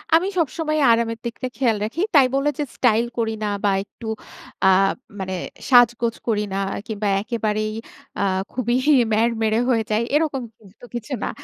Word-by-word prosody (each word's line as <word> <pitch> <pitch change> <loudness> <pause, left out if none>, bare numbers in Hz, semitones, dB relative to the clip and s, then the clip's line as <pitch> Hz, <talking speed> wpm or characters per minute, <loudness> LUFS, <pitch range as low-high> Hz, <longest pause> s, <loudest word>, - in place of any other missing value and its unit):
আমি 345 +4 +3
সবসময় 310 0 0
আরামের 230 0 +1
দিকটা 235 +2 -4
খেয়াল 235 -5 +2
রাখি। 230 +11 -3
তাই 270 -3 +7
বলে 275 +2 +2
যে, - - +1
স্টাইল 230 -2 +3
করি 225 -1 0
না - - 0 0.2
বা 205 - +3
একটু 215 +3 -14 0.6
আ - - +7 0.5
মানে 190 0 -3 0.4
সাজগোজ 240 -2 +5
করি 210 -2 +1
না - - -1 0.3
কিংবা 215 -1 -2
একেবারেই 215 -1 -2 0.5
আ - - 0 0.3
খুবই 240 -1 0 0.4
ম্যাড়মেড়ে 225 0 +2
হয়ে 230 -3 +2
যাই। 215 +1 +2
এরকম 295 -3 +1 0.2
কিন্তু 210 +3 -16
কিছু 240 +4 -5
না। - - -1
230 Hz, 155 wpm, -22 LUFS, 215-255 Hz, 0.6 s, তাই